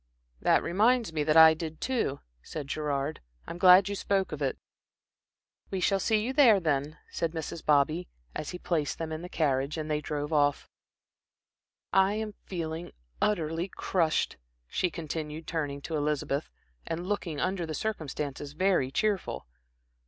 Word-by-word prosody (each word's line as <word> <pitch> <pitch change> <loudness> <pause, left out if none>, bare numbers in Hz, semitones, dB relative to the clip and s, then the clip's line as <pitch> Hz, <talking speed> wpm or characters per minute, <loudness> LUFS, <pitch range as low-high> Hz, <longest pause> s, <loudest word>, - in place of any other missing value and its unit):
"That - - +4
reminds 215 +2 +2
me 155 -2 0
that 155 +1 +4
I 160 0 +10
did 160 0 -6
too," 235 - -1 0.2
said 150 - -6
Gerard. 145 0 -2 0.2
"I'm 170 - -7
glad 185 +1 +8
you 200 - -2
spoke 195 -1 0
of 150 -1 -5
it." 135 -2 0 1.1
"We 190 - -2
shall 195 +2 +2
see 215 +1 +2
you 260 - -2
there, 250 -8 +6
then," 150 -2 -1
said 165 -1 -2
Mrs. 160 0 -5
Bobby, 155 +4 +2 0.3
as 150 - -4
he 180 - -5
placed 160 -5 -1
them 165 -1 -4
in 155 0 -4
the 180 - -7
carriage, 140 -2 0
and 155 0 -3
they 150 0 0
drove 150 0 -3
off. 145 -1 +2 1.3
"I 195 +1 +4
am 215 -1 -3
feeling 165 -2 -4 0.3
utterly 165 -3 0
crushed," 175 -4 0 0.3
she 180 - 0
continued, 155 -1 -5
turning 145 -4 -3
to 160 - -3
Elizabeth, 150 -1 -1 0.4
and 165 +2 -3
looking 180 -7 -2
under 185 -1 -1
the 155 - -3
circumstances, 145 -8 -4
very 180 -5 +2
cheerful. 205 +5 -1
160 Hz, 155 wpm, -29 LUFS, 150-185 Hz, 1.3 s, I